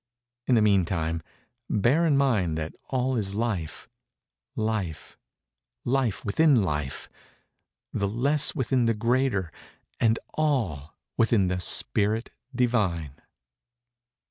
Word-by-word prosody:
In 125 - +4
the 110 - +4
meantime 85 -5 +1 0.5
bear 130 +11 +2
in 145 -3 +3
mind 105 - +1
that 80 0 -4 0.2
all 130 0 0
is 100 -4 -2
Life—Life—Life 110 - -5
within 130 +2 +4
Life—the 75 +5 -6
less 140 +8 +1
within 130 -3 +1
the 115 -1 +2
greater, 115 - 0 0.5
and 115 -1 +3 0.2
all 110 - -1 0.2
within 110 -5 +3
the 90 0 -1
Spirit 105 - +1 0.2
Divine." 105 - 0
110 Hz, 90 wpm, -26 LUFS, 90-125 Hz, 0.5 s, In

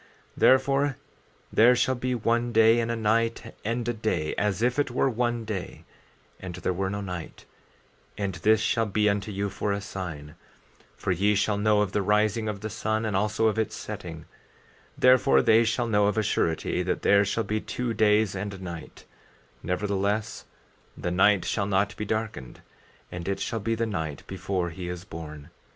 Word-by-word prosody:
14:4 - - -26 0.3
Therefore, 135 +1 +3 0.6
there 120 +3 +6
shall 130 +2 +2
be 125 0 -2
one 120 +1 0
day 115 +1 +5
and 115 0 -1
a 115 - 0
night 115 +1 0
and 115 +2 -2
a 120 - +1
day, 110 -9 -1
as 105 +1 -1
if 125 +3 +1
it 145 - +1
were 125 +2 +1
one 120 0 -1
day 105 -4 -5 0.6
and 90 -2 -7
there 90 0 -2
were 95 +1 -1
no 100 +1 -3
night; 90 -4 -7 0.7
and 100 -2 -2
this 110 0 +4
shall 115 0 +1
be 105 +1 +1
unto 100 +1 0
you 100 +1 -2
for 100 +1 -2
a 100 - -1
sign; 85 -7 -7 0.6
for 95 - -2
ye 100 +4 +2
shall 105 +1 +1
know 105 0 +3
of 105 -2 0
the 105 - 0
rising 105 +2 +1
of 100 -2 -5
the 110 - -4
sun 110 +2 -1
and 105 -3 -1
also 105 +3 +1
of 110 0 +2
its 110 - -1
setting; - - -7 0.7
therefore 125 - +5
they 110 +1 +5
shall 115 +2 0
know 105 -3 +2
of 105 - 0
a 110 - +2
surety 80 -5 0
that - - -2
there 100 0 +5
shall 110 +3 -1
be 110 +1 -2
two 125 -2 -3
days 105 -1 +3
and 100 +1 -4
a - - -9
night; 85 -3 -9 0.6
nevertheless 100 +3 -1 0.5
the 90 - -3
night 95 +1 +4
shall 100 -3 -1
not 100 +2 +1
be 105 - -4
darkened; 110 - -4 0.5
and 90 0 -6
it 100 - -1
shall 115 - -2
be 115 +2 -1
the 115 +1 -1
night 80 -9 -4
before 95 -2 -3
he 90 +2 -6
is 90 0 -6
born. 80 -3 -9
105 Hz, 190 wpm, -26 LUFS, 95-115 Hz, 0.7 s, there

